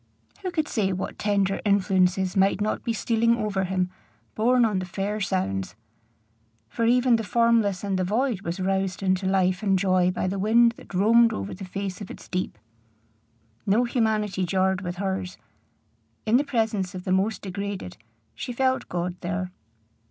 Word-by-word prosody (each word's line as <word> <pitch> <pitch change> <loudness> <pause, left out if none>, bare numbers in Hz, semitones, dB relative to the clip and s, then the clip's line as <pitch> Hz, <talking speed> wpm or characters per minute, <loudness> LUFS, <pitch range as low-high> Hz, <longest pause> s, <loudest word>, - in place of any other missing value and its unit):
Who 375 - -2
could 315 -4 -1
say 200 -4 0
what 185 0 -4
tender 200 -2 +1
influences 190 -2 +2
might 195 0 +3
not 210 +1 -1
be 235 - -1
stealing 230 +1 +2
over 205 -4 -1
him, 180 -1 -1 0.4
borne 245 +2 +3
on 210 -4 0
the 185 - -4
fair 200 +3 -3
sounds? 95 - -2 0.9
for 230 - -2
even 245 0 +4
the 225 - -3
formless 225 -4 +2
and 195 -2 -1
the - - +1
void 220 +2 0
was 170 0 -4
roused 190 0 -1
into 185 0 +1
life 185 -1 +2
and 195 -3 +2
joy 185 -1 +3
by 185 - -2
the 195 +1 -2
wind 230 +4 +5
that - - -11
roamed 230 +4 +5
over 100 - -4
the 190 - -8
face 195 +1 -5
of 200 - -7
its - - -10
deep. 185 -10 -3 1.1
No 210 +5 +4
humanity 215 -5 0
jarred 190 +1 +1
with 175 -2 -4
hers. 190 -1 -3 0.9
In 225 +2 +4
the 280 - +2
presence 220 -9 -1
of 180 - -6
the 185 - -3
most 195 +4 +1
degraded, 195 - -5 0.4
she 180 - -5
felt 260 +1 0
God 175 0 -2
there. 180 +1 -3
195 Hz, 170 wpm, -25 LUFS, 185-225 Hz, 1.1 s, wind